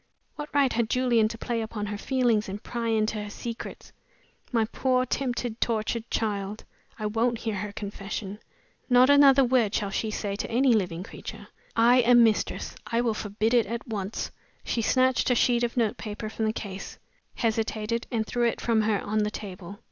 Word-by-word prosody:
What 295 Hz, 0 st, -6 dB
right 280 Hz, -3 st, +3 dB
had 230 Hz, -1 st, 0 dB
Julian 240 Hz, -3 st, +3 dB
to 230 Hz, -, -6 dB
play 230 Hz, 0 st, -2 dB
upon 220 Hz, -1 st, -4 dB
her 205 Hz, 0 st, -4 dB
feelings 240 Hz, -6 st, +1 dB
and 200 Hz, +2 st, -6 dB
pry 235 Hz, -1 st, -3 dB
into 215 Hz, -1 st, +1 dB
her 210 Hz, -, -7 dB
secrets? 230 Hz, +2 st, -7 dB, 0.6 s
My 230 Hz, -3 st, +2 dB
poor, 255 Hz, +2 st, +1 dB
tempted, 245 Hz, -3 st, -2 dB
tortured 230 Hz, 0 st, -1 dB
child! 205 Hz, -1 st, -2 dB, 0.3 s
I 215 Hz, -, -4 dB
won't 230 Hz, +3 st, +1 dB
hear 225 Hz, -1 st, -3 dB
her 205 Hz, +1 st, -4 dB
confession. 200 Hz, -1 st, -6 dB, 0.5 s
Not 250 Hz, +2 st, +6 dB
another 280 Hz, -1 st, +7 dB
word 240 Hz, -5 st, +2 dB
shall 200 Hz, -2 st, -1 dB
she 220 Hz, -, -1 dB
say 205 Hz, -2 st, -3 dB
to -, -, -4 dB
any 250 Hz, +2 st, +4 dB
living 180 Hz, -5 st, 0 dB
creature. -, -, -9 dB, 0.3 s
I 235 Hz, +2 st, +5 dB
am 240 Hz, -1 st, +6 dB
mistress 220 Hz, -2 st, 0 dB
I 230 Hz, 0 st, +1 dB
will 235 Hz, -2 st, +1 dB
forbid 215 Hz, +2 st, -1 dB
it 235 Hz, -4 st, +4 dB
at 235 Hz, +4 st, -5 dB
once!" 205 Hz, -2 st, -4 dB, 0.3 s
She 235 Hz, -, -1 dB
snatched 255 Hz, +3 st, +2 dB
a 250 Hz, -, +3 dB
sheet 240 Hz, 0 st, +3 dB
of 240 Hz, +1 st, -2 dB
notepaper 215 Hz, -1 st, -2 dB
from 220 Hz, 0 st, -2 dB
the 215 Hz, -, +2 dB
case; 200 Hz, -3 st, -7 dB, 0.4 s
hesitated, 225 Hz, 0 st, -1 dB
and 225 Hz, -2 st, -1 dB
threw 240 Hz, +2 st, +1 dB
it 230 Hz, -, -2 dB
from 230 Hz, -2 st, +2 dB
her 210 Hz, -2 st, +1 dB
on 215 Hz, +1 st, -1 dB
the 210 Hz, 0 st, +1 dB
table. 195 Hz, -2 st, -8 dB
225 Hz, 185 wpm, -27 LUFS, 210-240 Hz, 0.6 s, another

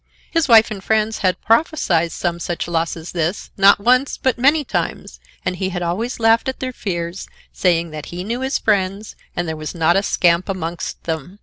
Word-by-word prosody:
His 330 Hz, -3 st, +1 dB
wife 225 Hz, -2 st, +6 dB
and 195 Hz, -3 st, -6 dB
friends 220 Hz, 0 st, +1 dB
had 185 Hz, -2 st, +1 dB
prophesied 220 Hz, -, +2 dB
some 170 Hz, -1 st, -2 dB
such 175 Hz, 0 st, -3 dB
loss 165 Hz, 0 st, -1 dB
as 165 Hz, +1 st, -8 dB
this, 170 Hz, +2 st, -2 dB
not 200 Hz, +1 st, +6 dB
once, 255 Hz, +5 st, +2 dB
but 260 Hz, -, +1 dB
many 285 Hz, +5 st, +3 dB
times, 65 Hz, -, -4 dB, 0.3 s
and 180 Hz, -, -1 dB
he 190 Hz, +1 st, -1 dB
had 175 Hz, -1 st, -3 dB
always 220 Hz, +10 st, -2 dB
laughed 225 Hz, +2 st, +3 dB
at 260 Hz, -, -5 dB
their 255 Hz, -1 st, -4 dB
fears, 170 Hz, -4 st, -4 dB, 0.3 s
saying 170 Hz, -3 st, +1 dB
that 155 Hz, -1 st, -7 dB
he 175 Hz, +1 st, -6 dB
knew 235 Hz, +5 st, -3 dB
his 265 Hz, +1 st, 0 dB
friends, 200 Hz, 0 st, -1 dB, 0.2 s
and 175 Hz, -1 st, -2 dB
there 160 Hz, -, -3 dB
was 155 Hz, +1 st, -6 dB
not 170 Hz, +1 st, +3 dB
a 195 Hz, -, +3 dB
scamp 175 Hz, -2 st, +2 dB
amongst 170 Hz, -3 st, -4 dB
them. 165 Hz, +3 st, -5 dB
190 Hz, 200 wpm, -20 LUFS, 170-225 Hz, 0.3 s, wife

